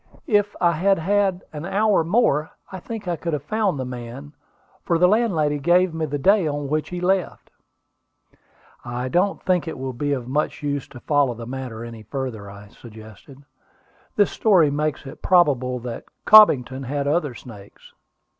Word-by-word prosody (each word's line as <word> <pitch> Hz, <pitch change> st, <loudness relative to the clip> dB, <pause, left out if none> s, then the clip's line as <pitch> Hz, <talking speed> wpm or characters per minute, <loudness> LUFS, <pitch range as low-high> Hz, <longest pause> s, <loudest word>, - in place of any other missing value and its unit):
If 205 Hz, -7 st, +1 dB
I 175 Hz, -1 st, +3 dB
had 190 Hz, +4 st, +2 dB
had 190 Hz, +1 st, 0 dB
an 150 Hz, 0 st, -6 dB
hour 195 Hz, 0 st, +2 dB
more, 160 Hz, -, +1 dB, 0.2 s
I 190 Hz, -, -7 dB
think 220 Hz, +1 st, -8 dB
I 175 Hz, -, 0 dB
could 165 Hz, +1 st, -4 dB
have 145 Hz, -2 st, -3 dB
found 210 Hz, -1 st, -1 dB
the 130 Hz, -, -3 dB
man; 125 Hz, +3 st, -8 dB, 0.5 s
for 170 Hz, -, +1 dB
the 180 Hz, +2 st, +5 dB
landlady 175 Hz, -9 st, +1 dB
gave 175 Hz, +3 st, +3 dB
me 160 Hz, -1 st, -2 dB
the 145 Hz, 0 st, -3 dB
day 190 Hz, +4 st, +3 dB
on 145 Hz, -1 st, -3 dB
which 155 Hz, +1 st, -1 dB
he 180 Hz, -, -5 dB
left." 185 Hz, 0 st, -1 dB, 1.3 s
"I 125 Hz, +1 st, -4 dB
don't 185 Hz, +6 st, 0 dB
think 180 Hz, -2 st, 0 dB
it 160 Hz, -, -5 dB
will 130 Hz, 0 st, -5 dB
be 145 Hz, +4 st, -2 dB
of 125 Hz, -3 st, -4 dB
much 150 Hz, +3 st, -2 dB
use 145 Hz, -2 st, -2 dB
to 120 Hz, -, -12 dB
follow 145 Hz, -5 st, +1 dB
the 115 Hz, 0 st, -8 dB
matter 125 Hz, -2 st, -6 dB
any 115 Hz, -1 st, -9 dB
further," 110 Hz, -3 st, -6 dB
I 100 Hz, +1 st, -13 dB
suggested. 110 Hz, +6 st, -14 dB, 0.7 s
"This 205 Hz, -2 st, +3 dB
story 180 Hz, -9 st, +3 dB
makes 150 Hz, 0 st, -2 dB
it 135 Hz, -, -11 dB
probable 140 Hz, -9 st, +2 dB
that 120 Hz, -1 st, -7 dB, 0.2 s
Cobbington 135 Hz, -, +6 dB
had 140 Hz, +2 st, -2 dB
other 145 Hz, -4 st, 0 dB
snakes." 105 Hz, -5 st, -14 dB
150 Hz, 175 wpm, -22 LUFS, 130-180 Hz, 1.3 s, Cobbington